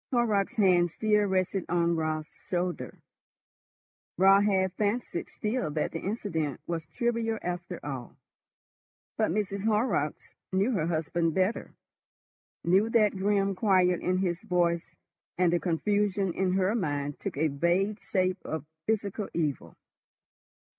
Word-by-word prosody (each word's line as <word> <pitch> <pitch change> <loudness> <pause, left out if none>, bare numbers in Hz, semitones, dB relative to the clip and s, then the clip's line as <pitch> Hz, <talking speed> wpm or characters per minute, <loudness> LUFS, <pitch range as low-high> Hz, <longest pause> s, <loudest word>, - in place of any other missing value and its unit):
Horrocks' 220 -6 +1
hand 180 -4 +4
still 210 +3 +2
rested 190 0 0
on 170 0 +2
Raut's 155 -1 -2 0.2
shoulder. 180 -1 -2 1.2
Raut 195 +2 +6
half 190 -2 +2
fancied 205 -2 -2
still 225 -1 -2
that 150 0 -1
the 165 - -4
incident 165 - -2
was 165 -2 -4
trivial 230 0 -1
after 175 0 -4
all. 135 -4 -6 1.0
But - - +2
Mrs. 200 +1 -2
Horrocks 210 - 0 0.2
knew 195 +6 +2
her 165 -9 0
husband 165 0 0
better, 190 +4 0 0.9
knew 190 +6 +3
that 215 -3 +3
grim 195 0 +1
quiet 185 -2 +3
in 185 0 +1
his 180 -1 -1
voice, 175 -5 0 0.4
and 175 -1 +3
the 175 - +3
confusion 195 +3 0
in 185 0 0
her 190 +2 +2
mind 145 -9 -2
took - - -5
a 155 +2 +2
vague 175 +8 +1
shape 185 -2 0
of 160 -2 -4 0.2
physical 210 -1 -1
evil. 150 -5 -2
185 Hz, 130 wpm, -28 LUFS, 170-205 Hz, 1.2 s, Raut